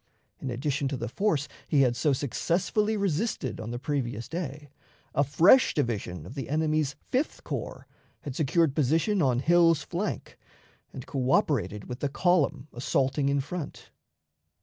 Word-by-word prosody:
In 135 - -4
addition 140 +3 -1
to 135 -1 -2
the 120 - -4
force 150 - 0 0.2
he 145 - +3
had 125 -3 +3
so 145 +5 +2
successfully 175 - 0
resisted 190 - -1
on 110 - -5
the 120 - -3
previous 125 -4 -3
day, 150 -4 -5 0.4
a 140 - +3
fresh 165 - +5
division 105 - -2
of 110 - -9
the 135 -1 -5
enemy's 155 -2 +1 0.2
Fifth 265 +5 -1
Corps - - -5 0.4
had 140 -3 -6
secured 155 0 +2
position 165 - +2
on 130 -4 +2
Hill's 165 -2 +4
flank, 185 +7 -4 0.5
and 130 - -8
coöperated 130 -6 0
with 125 -1 -6
the 145 - -1
column 155 -4 +1
assaulting 135 +3 0
in 140 0 +1
front. 155 +2 -7
145 Hz, 150 wpm, -28 LUFS, 130-165 Hz, 0.5 s, fresh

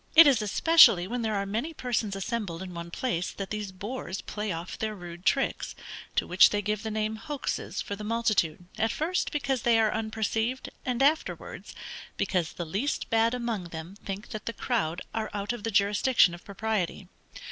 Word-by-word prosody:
It 330 +1 +11
is 270 -6 +5
especially 210 - +6
when 245 +3 -2
there 220 -2 0
are 200 0 0
many 235 +11 -3
persons 225 -6 -1
assembled 195 -4 -3
in 185 -1 -8
one 170 0 -6
place 180 -2 -1
that 195 -1 -6
these 210 -2 -3
boors 200 0 -5
play 210 -1 -4
off 165 0 -5
their 215 -1 -2
rude 175 -1 -8
tricks; 270 - +1 0.4
to - - +2
which 180 - +7
they 205 0 -1
give 210 +1 -1
the 220 - -3
name 215 0 -1
hoaxes 290 +4 -3
for 200 - -4
the 210 - -8
multitude, 210 -7 +1
at 225 - +2
first 345 +4 -1
because 265 -3 0
they 235 -1 +4
are 220 -1 +3
unperceived, 220 +3 -1 0.2
and 250 +1 +1
afterwards, 305 +3 0 0.4
because 180 -4 0
the 175 - -4
least 200 - -2
bad 230 +1 +3
among 235 -6 -2
them 165 +2 -8
think 195 +1 -5
that 215 - -7
the 230 - -1
crowd 190 -11 -1
are 220 -1 -2
out 205 +3 -2
of 240 - -6
the 225 - -1
jurisdiction 205 0 +4
of 175 - -10
propriety. 200 -3 -2
215 Hz, 190 wpm, -28 LUFS, 190-235 Hz, 0.4 s, It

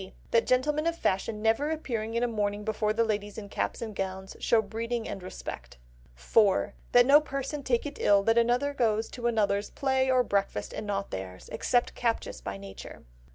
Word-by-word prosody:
That 230 - +3
gentlemen 295 +5 +2
of 335 - +1
fashion 210 - -1
never 225 +7 +2
appearing 230 -8 -3
in 235 - +1
a - - +3
morning 210 -2 -1
before 215 0 0
the 225 +2 +2
ladies 205 -2 -2
in 205 -2 -7
gowns - - -2
and 220 -2 -6
caps 190 0 -4
show 230 - +3
breeding 225 +2 -3
and 195 - -5
respect. - - -8 0.4
4. 195 - +2 0.2
That 245 0 +7
no 285 +3 +7
person 275 0 -4
take 250 -2 0
it 290 0 -6
ill 200 -1 +5
that 225 +2 +3
anyone 245 +5 +2
goes 225 -3 +1
to 240 -1 -3
another's 205 -3 +1
play 265 -1 +1
or 255 -1 +4
breakfast 200 - -1
and 215 - -5
not 200 -1 -2
theirs; 95 -1 -7
except 245 -1 +1
captious 230 -2 -2
by 100 - -5
nature. 100 0 -10
225 Hz, 190 wpm, -28 LUFS, 200-250 Hz, 0.4 s, That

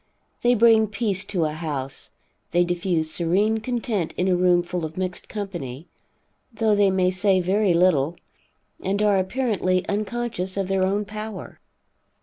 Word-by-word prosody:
They 245 +1 +4
bring 225 -1 +5
peace 205 -2 -1
to 180 -5 -1
a 155 - -1
house, 145 -4 -4 0.4
they 175 -2 +3
diffuse 175 -2 -1
serene 195 +7 +1
content 225 -6 -2
in 180 - +1
a 185 - +3
room 175 -1 +3
full 175 0 -4
of 160 +1 -6
mixed 185 -1 -4
company, 175 - -6 0.6
though 220 -1 +1
they 205 -1 +4
may 185 -1 +2
say 190 0 +2
very 190 +1 +2
little, 170 -3 +3 0.7
and 195 +2 -1
are 205 -2 +4
apparently 190 -3 0
unconscious 210 -2 -2
of 195 -1 -1
their 195 -1 +1
own 200 +3 +1
power. 215 0 -7
190 Hz, 150 wpm, -23 LUFS, 175-210 Hz, 0.7 s, bring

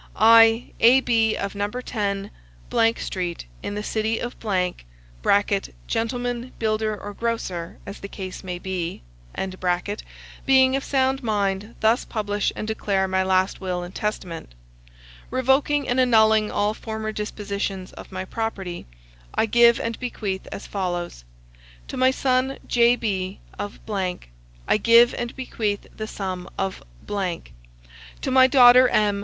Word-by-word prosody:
I, 225 +1 +6
A.B., 230 -2 +4
of 200 - -3
No. 205 0 -1
10,, 205 -4 -3 0.7
Street, 175 - -4 0.2
in 205 - -4
the 210 - -3
city 220 +1 -1
of 240 - -4 1.5
[gentleman, 245 +1 -2
builder, 215 -1 -1
or 205 - -7
grocer, 195 -7 -3
as 200 - -8
the 200 - -7
case 190 -2 -7
may 180 -1 -4
be,] 175 - -4 1.4
being 265 0 +5
of 270 - -1
sound 265 0 +1
mind, 205 -1 -1
thus 225 +3 +3
publish 205 -2 -1
and 215 - -5
declare 200 -3 0
my 190 0 +1
last 190 +1 +1
will 180 -2 -2
and 175 +1 -9
testament. 175 - -4 0.7
Revoking 265 +3 +2
and 245 +1 +1
annulling 220 -3 +4
all 205 +1 0
former 220 -1 -5
dispositions 200 -3 -4
of - - -11
my 185 0 -4
property, 190 - -4 0.5
I - - +3
give 235 +1 +5
and 230 -1 -3
bequeath 210 -6 -4
as - - -7
follows: 175 - -4 0.6
to - - -6
my 255 0 +4
son 260 0 +1
J.B., 220 -6 +1 0.2
of, 205 - -5 0.9
I - - +4
give 235 +2 +6
and 240 -1 -4
bequeath 215 -6 -3
the 215 - -5
sum 185 -3 -5
of; 195 -1 -2 0.3
to - - -6
my 260 0 +7
daughter 255 -1 +8
M. 205 -2 +2
215 Hz, 130 wpm, -23 LUFS, 190-235 Hz, 1.5 s, daughter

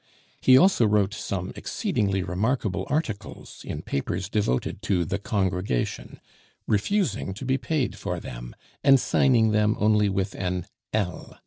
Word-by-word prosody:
He 130 0 +7
also 135 - +5
wrote 105 -1 +2
some 95 -4 -4
exceedingly 95 -2 -1
remarkable 95 0 -1
articles 115 -9 -4
in - - -6
papers 90 +7 -3
devoted 100 - -1
to 90 -4 +1
the 100 +5 -2
"Congregation," 95 - -2 0.5
refusing 110 - 0
to 120 - -7
be 130 +1 +1
paid 130 +1 -1
for - - -3
them, - - -8 0.3
and 135 -1 +7
signing 115 -4 +3
them 105 0 +2
only 105 -1 +3
with 95 0 -1
an 90 -2 -3 0.3
"L." 100 -4 -3
105 Hz, 135 wpm, -25 LUFS, 95-120 Hz, 0.5 s, He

